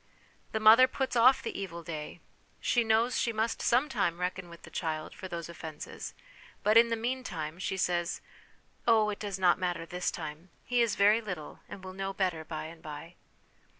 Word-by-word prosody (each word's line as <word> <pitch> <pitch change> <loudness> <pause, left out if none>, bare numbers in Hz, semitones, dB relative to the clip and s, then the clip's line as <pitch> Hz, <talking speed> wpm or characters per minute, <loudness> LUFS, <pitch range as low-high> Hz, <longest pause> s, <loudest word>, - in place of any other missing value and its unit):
The 220 - -1
mother 225 +4 +8
puts 260 0 -2
off 250 +3 +6
the - - -4
evil 170 -3 -6
day: 155 -2 -6 0.4
she 240 - +2
knows 225 +2 +2
she 235 - +1
must 220 +1 -1
sometime 240 - +2
reckon 180 0 -3
with 170 0 -13
the - - -12
child 155 -2 -3
for 190 - -8
those 170 -2 -5
offences, 160 -3 -8 0.5
but 215 +1 +4
in 230 +1 +7
the 230 - +1
meantime 220 -10 -3
she 190 0 -2
says, 175 -2 0 0.3
" - - -34
Oh, 220 -2 +5
it 205 - -6
does 200 -3 -3
not 180 -1 +4
matter 175 -2 -2
this 180 +1 -2
time; 160 +2 -7 0.2
he 245 -1 +2
is 230 -2 +2
very 210 +3 +5
little, 180 -8 -6
and 190 - -9
will 185 0 -7
know 195 0 -3
better 180 -5 -1
by 155 0 -5
and 160 +1 -10
by." 160 +2 -8
190 Hz, 190 wpm, -30 LUFS, 170-225 Hz, 0.5 s, mother